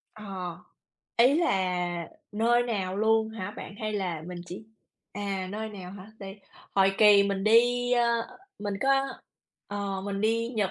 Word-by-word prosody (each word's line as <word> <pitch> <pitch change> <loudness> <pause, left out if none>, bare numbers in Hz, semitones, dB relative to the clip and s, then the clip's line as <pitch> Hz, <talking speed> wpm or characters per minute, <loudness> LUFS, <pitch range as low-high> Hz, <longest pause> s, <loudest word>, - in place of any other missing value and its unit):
Ờ, 190 -5 -6 0.6
ý 250 +4 +6
là 180 - 0 0.2
nơi 235 +3 +3
nào 195 -6 -2
luôn 220 +1 +3
hả 220 -3 -5
bạn? 200 - -8
Hay 215 0 -2
là 180 -6 -2
mình 180 0 -6
chỉ 180 +5 -8 0.5
à, 195 -2 -3
nơi 220 +2 -4
nào 190 -4 -9
hả? 195 0 -10
Đây, 195 +1 -9 0.3
hồi 195 0 +4
kỳ 205 -2 +8
mình 200 -1 -1
đi, 245 +3 +4
ơ, 235 -1 +3 0.4
mình 205 -1 -3
có 270 - +1 0.8
ờ, 200 -1 -3
mình 200 -1 -3
đi 230 +2 +1
Nhật 215 -6 -1
205 Hz, 155 wpm, -28 LUFS, 190-225 Hz, 0.8 s, kỳ